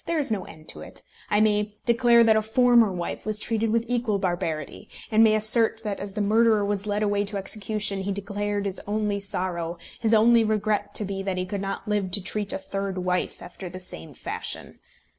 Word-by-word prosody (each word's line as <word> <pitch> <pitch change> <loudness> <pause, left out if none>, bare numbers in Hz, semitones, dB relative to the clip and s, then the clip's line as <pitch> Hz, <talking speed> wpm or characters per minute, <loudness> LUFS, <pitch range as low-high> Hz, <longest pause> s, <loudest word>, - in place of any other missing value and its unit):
There 335 - 0
is 285 -6 0
no 200 -4 -1
end 155 -1 -13
to - - -6
it. - - -12 0.3
I 210 - +3
may 210 -1 +2
declare 235 -1 +5
that 225 -1 +5
a 220 - +3
former 235 0 +4
wife 175 -2 -4
was 215 -1 -2
treated 225 +1 0
with 230 +1 +1
equal 240 -4 0
barbarity; 175 -5 -3 0.2
and 220 +1 +5
may 215 -1 +5
assert 220 +1 +3
that, 210 -2 -3
as 200 -1 -5
the 210 0 -1
murderer 215 0 +3
was 205 0 -2
led 205 +1 0
away 205 -1 +1
to 205 0 -4
execution, 200 0 -1
he 195 +1 -2
declared 205 +1 -2
his 195 -1 -2
only 210 -1 -1
sorrow, 180 -3 -2 0.2
his 225 -1 +3
only 230 +1 +5
regret 210 -1 -1
to 210 - +4
be, 195 0 -4
that 190 -1 -2
he 185 - -1
could 195 +1 -4
not 195 +3 -4
live 205 -3 0
to 190 +1 0
treat 205 +1 -2
a - - -2
third 195 0 -4
wife 180 0 -2
after 185 - -8
the 185 +1 -8
same 80 - -7
fashion. - - -4
205 Hz, 215 wpm, -25 LUFS, 195-220 Hz, 0.3 s, declare